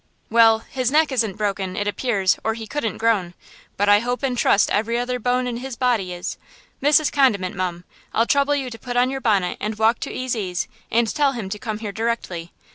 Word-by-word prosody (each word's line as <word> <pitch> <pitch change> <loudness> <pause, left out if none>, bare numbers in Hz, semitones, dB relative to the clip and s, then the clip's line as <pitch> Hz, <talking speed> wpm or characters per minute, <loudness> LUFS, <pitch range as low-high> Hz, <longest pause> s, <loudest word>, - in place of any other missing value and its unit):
"Well! 225 -1 +5
his 255 -2 -1
neck 305 +1 +3
isn't 225 -7 0
broken, 195 -3 -2
it 205 - -2
appears, 205 -3 +1
or 220 0 0
he 225 -1 -7
couldn't 230 -1 -3
groan; 205 -6 +1 0.4
but 205 - +1
I 205 0 +6
hope 245 +4 -3
and 260 -2 0
trust 205 -3 +3
every 225 +3 +1
other 250 +1 -2
bone 250 +2 +1
in 245 -1 -3
his 260 0 -6
body 235 -7 0
is! 175 0 -5 0.4
Mrs. 295 +2 +4
Condiment, 215 -10 +2
mum! 180 -2 -3 0.3
I'll 230 - +2
trouble 280 +3 +2
you 265 -3 -3
to 230 - -9
put 245 -1 -4
on 250 +1 +3
your 270 0 -4
bonnet 200 -7 +1
and 210 +1 -3
walk 220 +2 +3
to - - -5
Ezy's 215 -8 -2 0.2
and 235 +1 +3
tell 280 +3 +1
him 220 -6 -5
to 210 +1 -5
come 215 -1 -4
here 215 -2 -5
directly! 200 -6 -3
230 Hz, 210 wpm, -22 LUFS, 205-250 Hz, 0.4 s, I